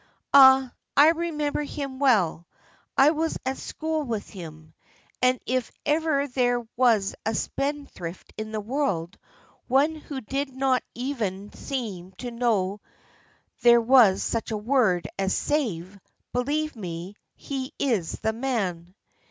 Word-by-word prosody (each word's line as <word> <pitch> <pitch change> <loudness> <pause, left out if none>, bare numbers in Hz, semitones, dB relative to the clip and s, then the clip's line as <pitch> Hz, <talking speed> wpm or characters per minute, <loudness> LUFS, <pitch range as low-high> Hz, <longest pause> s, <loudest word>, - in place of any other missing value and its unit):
Ah, 265 -2 +8 0.2
I 295 +2 +8
remember 320 -3 -1
him 280 -2 -5
well: 190 - +2 0.5
I 280 +3 +7
was 320 +1 -1
at 265 +1 -2
school 315 0 -3
with 230 -7 -4
him, 160 -4 -11 0.5
and 255 0 +3
if 255 -1 -1
ever 300 -2 +1
there 245 -2 0
was 230 -6 +3
a 220 +1 -1
spendthrift 275 - -4
in 215 0 -6
the 215 - -2
world, 205 - -2 0.5
one 275 +5 +3
who 295 -3 -7
did 270 +4 -3
not 265 -1 +2
even 215 -6 -3
seem 200 -9 -5
to 245 +6 -7
know 210 -5 0 0.8
there 235 0 +7
was 230 -5 +5
such 230 0 -2
a 220 - -2
word 215 -6 +2
as 195 -1 +1
'save,' 200 - -2 0.3
believe 295 +5 -1
me, 180 -1 -6 0.2
he 265 -2 -5
is 220 - 0
the 220 - 0
man." 195 -8 -3
245 Hz, 130 wpm, -25 LUFS, 200-275 Hz, 0.8 s, Ah